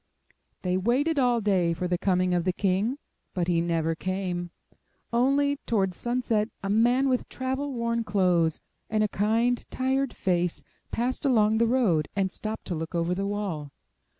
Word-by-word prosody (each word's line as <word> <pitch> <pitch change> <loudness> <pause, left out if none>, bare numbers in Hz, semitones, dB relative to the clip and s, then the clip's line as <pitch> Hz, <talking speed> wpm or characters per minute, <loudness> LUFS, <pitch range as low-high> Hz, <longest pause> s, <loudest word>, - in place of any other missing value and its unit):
They 180 0 +1
waited 270 - +1
all 245 -3 +3
day 185 -5 +2
for 180 +2 -2
the 175 -1 0
coming 185 -1 +2
of 175 -1 +1
the 185 - +1
King, 200 +7 0 0.4
but 175 -2 0
he 170 -2 +2
never 165 -1 0
came; 180 0 -3 0.6
only, 280 +4 +3
towards 190 -5 +1
sunset, 240 -2 0
a 195 - -1
man 245 +5 +3
with 255 -2 0
travel 265 +2 -3
worn 235 -2 -1
clothes, 180 -6 +2 0.3
and 215 -1 +2
a - - +3
kind, 225 +5 +1
tired 265 +1 0
face 180 -2 0 0.3
passed 245 +2 -1
along 220 -5 +3
the 230 - +4
road, 205 - +2
and 195 -1 0
stopped 215 +3 -5
to - - -3
look 160 +2 -5
over 170 +1 +1
the 195 +2 -2
wall. 195 -8 -3
205 Hz, 165 wpm, -27 LUFS, 180-245 Hz, 0.6 s, the